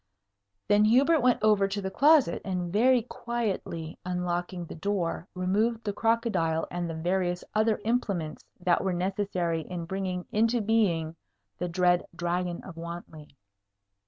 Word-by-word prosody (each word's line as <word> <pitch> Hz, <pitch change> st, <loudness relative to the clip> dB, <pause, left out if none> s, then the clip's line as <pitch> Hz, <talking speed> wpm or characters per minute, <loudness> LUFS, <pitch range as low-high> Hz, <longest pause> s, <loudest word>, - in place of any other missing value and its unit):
Then 205 Hz, +1 st, +5 dB
Hubert 275 Hz, +9 st, +5 dB
went 250 Hz, -4 st, +2 dB
over 210 Hz, -2 st, +4 dB
to 200 Hz, +1 st, -3 dB
the 190 Hz, -1 st, -4 dB
closet, 290 Hz, -, +4 dB
and 180 Hz, -2 st, -3 dB
very 245 Hz, +3 st, +4 dB
quietly 215 Hz, -10 st, -4 dB
unlocking 180 Hz, 0 st, -2 dB
the -, -, -9 dB
door 175 Hz, -1 st, -2 dB
removed 215 Hz, +6 st, 0 dB
the 205 Hz, -, -2 dB
crocodile 205 Hz, -8 st, +1 dB
and 175 Hz, -1 st, -3 dB
the 165 Hz, -, -4 dB
various 175 Hz, +2 st, -1 dB
other 215 Hz, 0 st, +2 dB
implements 200 Hz, -10 st, -1 dB, 0.2 s
that 175 Hz, -1 st, +2 dB
were 190 Hz, -, 0 dB
necessary 180 Hz, -2 st, -1 dB
in 170 Hz, +1 st, -6 dB
bringing 185 Hz, 0 st, -3 dB
into 230 Hz, +3 st, +2 dB
being 185 Hz, -8 st, +1 dB, 0.4 s
the 180 Hz, -, -2 dB
dread 175 Hz, 0 st, +3 dB
Dragon 175 Hz, 0 st, -2 dB
of 180 Hz, -4 st, -10 dB
Wantley. 165 Hz, -3 st, -8 dB
185 Hz, 140 wpm, -28 LUFS, 175-215 Hz, 0.4 s, Then